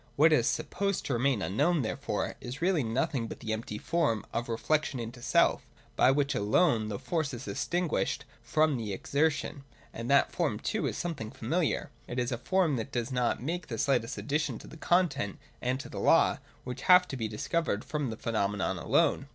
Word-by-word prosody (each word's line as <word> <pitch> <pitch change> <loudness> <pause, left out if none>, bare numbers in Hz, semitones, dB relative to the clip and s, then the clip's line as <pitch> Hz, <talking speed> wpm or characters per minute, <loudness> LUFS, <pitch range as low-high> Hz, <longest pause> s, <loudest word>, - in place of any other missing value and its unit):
What 155 +2 +6
is 120 -6 +3
sup 155 -1 -1
posed 200 0 -1
to 140 - -1
remain 120 -3 +1
unknown, 145 - +2
therefore, 110 - -2
is 125 +2 -6
really 175 -2 +2
nothing 125 +1 -1
but - - -8
the 110 -1 -3
empty 110 -1 -4
form 150 -4 0
of 120 +1 -2
reflection 145 +4 0
into 120 +1 -6
self, - - +3 0.3
by - - +5
which 140 +1 +2
alone 110 - +2
the 105 -2 -3
Force 155 - -2
is 120 +4 -8
distinguished 175 - -1 0.2
from 155 -3 +2
the 110 -4 -3
Exertion, 145 - 0
— - - -27
and 115 +2 -5
that 140 0 +4
form - - 0
too - - -1
is - - -3
something 155 -11 -4
familiar. - - -1 0.2
It 120 - -5
is 125 +1 0
a 120 - -2
form 175 -2 +2
that 115 +4 -4
does 120 0 -2
not 125 -1 0
make 165 +2 -3
the 115 - -4
slightest 130 -3 +1
addition 150 -4 -1
to - - -12
the - - -11
content 175 -3 +1 0.2
and 125 +1 0
to - - -7
the - - -7
law, - - +4 0.2
which 125 +1 -6
have 180 0 +8
to 135 - -4
be 115 -4 -2
discovered 110 +2 -1
from 150 -4 -2
the 110 - -5
pheno 110 -4 0
menon 95 -2 -2
alone. - - +2
135 Hz, 200 wpm, -30 LUFS, 115-155 Hz, 0.3 s, have